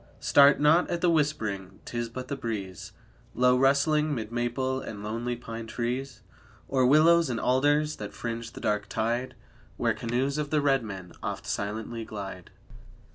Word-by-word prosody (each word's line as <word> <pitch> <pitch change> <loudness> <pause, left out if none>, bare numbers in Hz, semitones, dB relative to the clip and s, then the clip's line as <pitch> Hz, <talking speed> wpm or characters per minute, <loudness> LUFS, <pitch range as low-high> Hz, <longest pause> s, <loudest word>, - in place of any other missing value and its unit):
Start 140 0 +6
not 155 +4 +4
at 175 -1 -2
the 175 - +4
whispering, 110 - -1
'tis 120 -1 -3
but 125 +2 -7
the 140 - -3
breeze, 100 -8 -5 0.4
Low 125 0 +4
rustling, 145 +3 +3
'mid 110 -2 -5
maple 130 +2 -1
and 105 -4 -7
lonely 115 +3 -3
pine 115 -1 -7
trees, 120 +2 -4 0.4
Or 130 -2 +2
willows 160 +3 +5
and 120 -2 -2
alders 145 +4 +2
that 105 -1 -6
fringe 115 0 -5
the - - -9
dark 105 -1 0
tide 120 +4 -1 0.4
Where 115 -1 +1
canoes 125 +6 -1
of 145 -1 -2
the 155 - +2
red 135 -3 +2
men 95 -5 -7
oft - - -4
silently 110 +3 -3
glide. 95 -5 -7
120 Hz, 160 wpm, -28 LUFS, 110-140 Hz, 0.4 s, Start